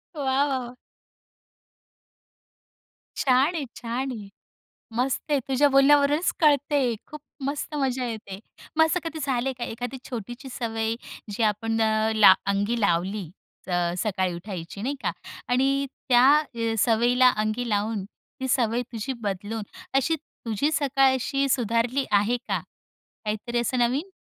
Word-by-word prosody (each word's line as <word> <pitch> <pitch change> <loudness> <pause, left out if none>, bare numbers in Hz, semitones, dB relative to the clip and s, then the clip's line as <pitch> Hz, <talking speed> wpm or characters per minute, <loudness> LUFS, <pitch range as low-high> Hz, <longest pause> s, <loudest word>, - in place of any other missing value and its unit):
वाह, 285 -2 -3
वाह, 270 +2 +2
वाह! 255 -3 -3 2.4
छान 270 +5 +3
आहे, 300 -4 -2
छान 250 +3 -3
आहे. 210 -4 -8 0.7
मस्त 265 +4 -1
आहे. 285 -2 +3
तुझ्या 275 +2 +4
बोलण्यावरूनच 285 +3 +4
कळतंय, 285 -4 +3
खूप 300 -1 -9 0.2
मस्त 285 +2 -3
मजा 260 -3 0
येते. 210 -4 -6 0.4
मग 320 - +6
असं 345 +3 0
कधी 320 -1 -4
झालंय 265 -1 0
का 240 - -3
एखादी 245 +3 -5
छोटीशी 240 +3 -6
सवय 225 -2 -2 0.4
जी 215 +3 -3
आपण 225 +1 0
अ, 220 0 +2
ला 205 -3 +8 0.2
अंगी 205 +4 0
लावली 185 0 0 0.4
अ, 175 -1 0
सकाळी 185 -4 0
उठायची 180 +1 -7
नाही 275 +4 -1
का - - 0 0.4
आणि 275 +2 +2 0.2
त्या 245 0 +6 0.3
अ, 230 -1 -1
सवयीला 240 +3 +4
अंगी 215 +3 -1
लावून 205 -1 -1 0.4
ती 260 - -2
सवय 240 -1 +1
तुझी 230 +4 -3
बदलून 205 +2 -3 0.3
अशी 275 +5 +2
तुझी 275 -2 -3
सकाळ 270 -2 +3
अशी 275 +2 0
सुधारली 240 +2 +1
आहे 210 +4 +3
का? - - -3 0.6
काहीतरी 215 +3 -2
असं 250 +2 -1
नवीन? 260 +10 +1
245 Hz, 135 wpm, -25 LUFS, 215-275 Hz, 2.4 s, ला